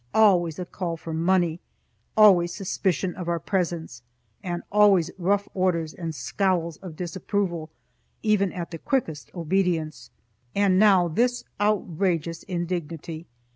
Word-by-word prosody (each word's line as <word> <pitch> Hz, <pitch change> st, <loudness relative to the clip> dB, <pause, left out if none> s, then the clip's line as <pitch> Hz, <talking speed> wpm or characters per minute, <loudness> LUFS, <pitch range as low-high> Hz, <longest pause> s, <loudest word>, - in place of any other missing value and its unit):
Always 180 Hz, -7 st, +4 dB
a 180 Hz, -, -4 dB
call 170 Hz, -2 st, -4 dB
for 160 Hz, 0 st, -7 dB
money, 170 Hz, 0 st, +1 dB, 0.6 s
always 185 Hz, -5 st, +6 dB
suspicion 185 Hz, -1 st, -1 dB
of 180 Hz, -2 st, -5 dB
our 170 Hz, -, +1 dB
presence 170 Hz, -8 st, -2 dB, 0.4 s
and 175 Hz, -1 st, -4 dB
always 200 Hz, -5 st, +5 dB
rough 200 Hz, +3 st, +1 dB
orders 170 Hz, -4 st, 0 dB
and 165 Hz, -3 st, -5 dB
scowls 170 Hz, -3 st, -1 dB
of 180 Hz, -5 st, -9 dB
disapproval, 175 Hz, -1 st, -2 dB, 0.5 s
even 205 Hz, -4 st, +2 dB
at 175 Hz, -2 st, -6 dB
the 165 Hz, -, -6 dB
quickest 190 Hz, -, -2 dB
obedience. 165 Hz, -5 st, -1 dB, 0.5 s
And 195 Hz, -2 st, +3 dB
now 195 Hz, -4 st, +5 dB
this 245 Hz, +9 st, +1 dB, 0.2 s
outrageous 175 Hz, -5 st, 0 dB
indignity! 170 Hz, -3 st, -4 dB
175 Hz, 125 wpm, -25 LUFS, 165-195 Hz, 0.6 s, always